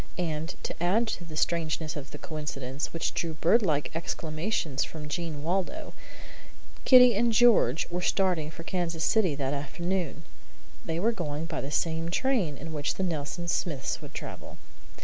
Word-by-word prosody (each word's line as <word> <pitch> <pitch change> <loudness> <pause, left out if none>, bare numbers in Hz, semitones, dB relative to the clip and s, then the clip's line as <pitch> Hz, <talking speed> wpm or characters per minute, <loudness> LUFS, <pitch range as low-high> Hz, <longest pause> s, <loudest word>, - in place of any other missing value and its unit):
And 165 -1 -2
to - - -3
add 205 +7 +3
to 175 - -4
the 155 -2 -8
strangeness 160 -1 0
of 145 0 -6
the - - -8
coincidence, 145 -3 -4
which 165 - -2
drew 165 -2 -2
birdlike 165 -3 +2
exclamations 160 -2 -1
from 155 -2 -7
Jean 150 -1 -3
Waldo, 195 - -2 0.9
George 255 -1 +10
and 235 0 +2
Kitty 165 - +5
were 175 +1 -1
starting 180 -5 +1
for 165 +1 -9
Kansas 170 -2 -2
City 190 -9 +3
that 135 -1 -1
afternoon. 165 +3 -2 0.6
They 165 0 -2
were 220 +6 +3
going 160 -7 -3
by 165 -3 -3
the 140 - -5
same 165 +2 0
train 190 - +1
in 160 +4 -7
which 145 -2 -1
the 190 - -2
Nelson 170 0 -3
Smiths 155 -5 -1
would - - -11
travel. - - -7
165 Hz, 160 wpm, -28 LUFS, 150-180 Hz, 0.9 s, George